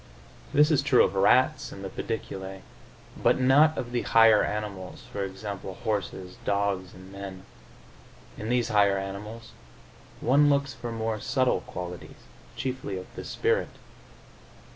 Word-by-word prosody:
This 150 +1 +5
is 145 -3 +4
true 140 -3 +5
of 95 - 0
rats 130 +9 +3
and 100 0 -8
the - - -4
pediculae, 95 -4 -5 0.6
but - - +3
not 145 +5 +5
of 120 - -4
the 120 -1 0
higher 115 -2 +6
animals, 105 -3 -5
e. 100 -1 -2
g., 95 +3 -10 0.4
horses, 95 -3 -3
dogs 100 -2 -1
and 95 +1 -13
men. 95 -1 -8 0.9
In 110 - -6
these 120 -1 +1
higher 100 -2 +4
animals 105 +4 -7 0.7
one 145 +4 +4
looks 140 -1 +1
for 120 0 -6
more 110 -1 -2
subtle 130 +1 +1
qualities, 90 0 -8 0.3
chiefly 130 -7 -4
of 95 - -10
the - - -6
spirit. - - 0
105 Hz, 140 wpm, -27 LUFS, 95-130 Hz, 0.9 s, higher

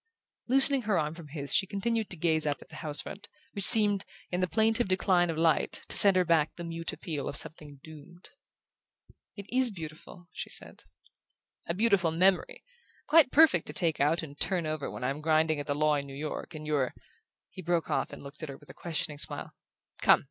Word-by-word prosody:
Loosening 270 +1 +5
her 210 -5 0
arm 150 0 -1
from 165 -2 -11
his 140 -1 -5
she 195 - +2
continued 220 +3 -2
to 180 - -6
gaze 160 -1 +1
up 145 -1 -1
at - - -16
the 155 - -10
house 150 -2 -1
front, 205 +1 -10 0.2
which 200 - -2
seemed, 205 -3 +5 0.3
in 180 - -1
the 185 - +1
plaintive 225 +3 +1
decline 185 -2 +2
of 165 - -3
light, 160 -1 +1
to - - +1
send 200 -2 +8
her 185 -1 +3
back 160 -2 +1
the 170 - -7
mute 165 0 -4
appeal 150 -4 -5
of - - -6
something 150 -2 -6
doomed. 160 +3 -14 1.0
"It 200 -2 -9
IS 255 0 +3
beautiful," 170 -1 -10
she - - -6
said. - - -5 0.8
"A 170 - -2
beautiful 200 -5 +2
memory! 180 +3 +1 0.4
Quite 300 -3 +5
perfect 305 - +4
to 150 - -6
take 165 0 0
out 155 +4 +1
and 145 -2 -10
turn 180 -4 -1
over 155 -2 -3
when - - -8
I'm 135 +4 -2
grinding 155 0 +2
at 145 - -6
the 145 - -1
law 155 +1 +2
in 140 -1 -2
New 135 0 -9
York, 155 +2 -6
and 155 0 -8
you're 145 -4 -1 0.3
" - - -63
He 185 - -9
broke 170 -1 -1
off - - -1
and - - -10
looked 140 +3 -12
at 155 - -6
her 135 - -8
with 145 - -14
a - - -15
questioning 160 -3 -3
smile. - - -3 0.5
"Come! - - +6
165 Hz, 215 wpm, -29 LUFS, 150-195 Hz, 1.0 s, send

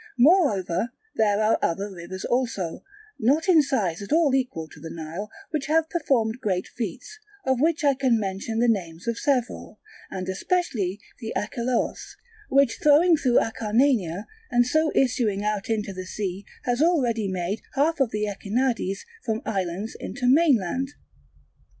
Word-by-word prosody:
Moreover 240 - +3 0.3
there 210 -2 +3
are 215 - +3
other 195 +4 -1
rivers 185 +1 -7
also, 230 -9 -1 0.4
not 285 - +2
in 340 -4 +7
size 215 - -1
at 200 - -8
all 315 -3 +4
equal 250 -12 -1
to - - -14
the 165 +2 -8
Nile, 165 +6 -6 0.2
which 300 -4 -2
have 320 +1 +2
performed 250 -8 +1
great 185 -3 0
feats; 245 - -6 0.3
of 260 -1 +1
which 320 +1 +2
I 285 -1 +5
can 260 -4 +2
mention 200 +2 -3
the 240 +1 +3
names 180 -4 -1
of 235 0 -1
several, 250 -6 -1 0.3
and 185 -1 -5
especially 205 - -1 0.2
the 225 -3 -5
Acheloos, 235 +3 -2 0.3
which 275 -2 +3
flowing 315 +4 +6
through 255 -5 +3
Acarnania 220 - +1 0.2
and 245 0 +3
so 315 +4 +2
issuing 230 -6 +1
out 210 0 -2
into 210 -3 -1
the 185 0 -7
sea 195 -1 -4 0.2
has 245 +2 0
already 250 - +2
made 185 +2 -2
half 305 +3 +2
of 270 -4 +3
the 210 -1 -1
Echinades 205 0 -1 0.2
from 225 +2 -2
islands 195 +1 -2
into 250 - -5
mainland. 270 - +3
225 Hz, 150 wpm, -25 LUFS, 195-270 Hz, 0.4 s, in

